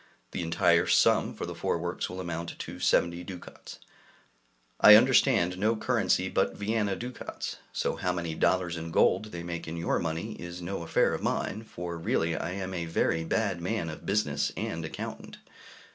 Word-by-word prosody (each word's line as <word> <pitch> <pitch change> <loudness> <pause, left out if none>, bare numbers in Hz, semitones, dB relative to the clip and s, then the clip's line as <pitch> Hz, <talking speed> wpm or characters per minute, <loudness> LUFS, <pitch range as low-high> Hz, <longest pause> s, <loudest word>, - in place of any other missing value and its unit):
The - - -3
entire 85 0 +3
sum - - +3
for - - -4
the - - -5
four - - -1
works 85 +2 -3
will 90 - -6
amount 85 -2 -5
to - - -7
70 85 +1 +2
ducats; 90 -1 -10 1.0
I 105 - +10
understand 110 -6 +4
no 110 +3 +2
currency 110 - +1
but - - 0
Vienna 105 -1 0
ducats, 125 +3 -6
so - - -1
how 90 - 0
many 85 -2 -3
dollars 90 +1 +1
in 80 0 -5
gold 95 - +3
they 85 -5 -7
make 85 -1 -5
in 80 +2 -5
your 85 - 0
money 85 +6 -3
is 85 0 -7
no 90 +1 -4
affair 85 - +2
of - - -3
mine, 110 - -2
for 85 -4 -6
really 80 0 0
I 85 +2 -3
am 95 -1 -4
a 85 -2 -2
very 80 0 0
bad 95 0 -1
man 90 -3 -2
of 80 - -10
business 75 -9 +1
and 80 0 -3
accountant. 80 - -7
85 Hz, 175 wpm, -29 LUFS, 85-100 Hz, 1.0 s, I